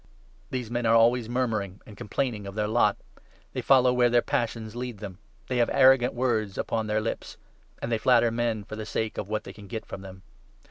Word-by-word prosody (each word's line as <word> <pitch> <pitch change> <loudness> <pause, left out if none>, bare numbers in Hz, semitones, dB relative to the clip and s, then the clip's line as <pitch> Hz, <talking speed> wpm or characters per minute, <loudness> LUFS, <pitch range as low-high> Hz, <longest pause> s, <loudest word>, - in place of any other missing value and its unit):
' - - -31
These 125 -3 -4
men 120 -1 0
are 115 - +5
always 115 0 +4
murmuring, 110 -6 -1
and 105 - -12
complaining 105 -1 -3
of 100 - -8
their 105 -1 0
16 105 - -3
lot; 105 -3 +3 0.6
they - - -2
follow 130 -2 +5
where 125 -1 +4
their 120 0 +3
passions 115 -1 -2
lead 125 -2 -5
them; 95 -2 -8 0.3
they 125 - -1
have 120 - +3
arrogant 130 -2 +5
words 110 -6 0
upon 110 -1 -1
their 105 0 +1
lips; 110 - -4 0.5
and 115 - -2
they 115 - +1
flatter 120 -1 +4
men 115 -2 -1
for 110 - -8
the 110 0 -6
sake 110 +1 -2
of 100 - -5
what 110 0 -2
they - - -9
can 105 -1 -13
get 110 +3 -5
from 95 - -8
them. 95 -1 -11
115 Hz, 225 wpm, -27 LUFS, 105-120 Hz, 0.6 s, are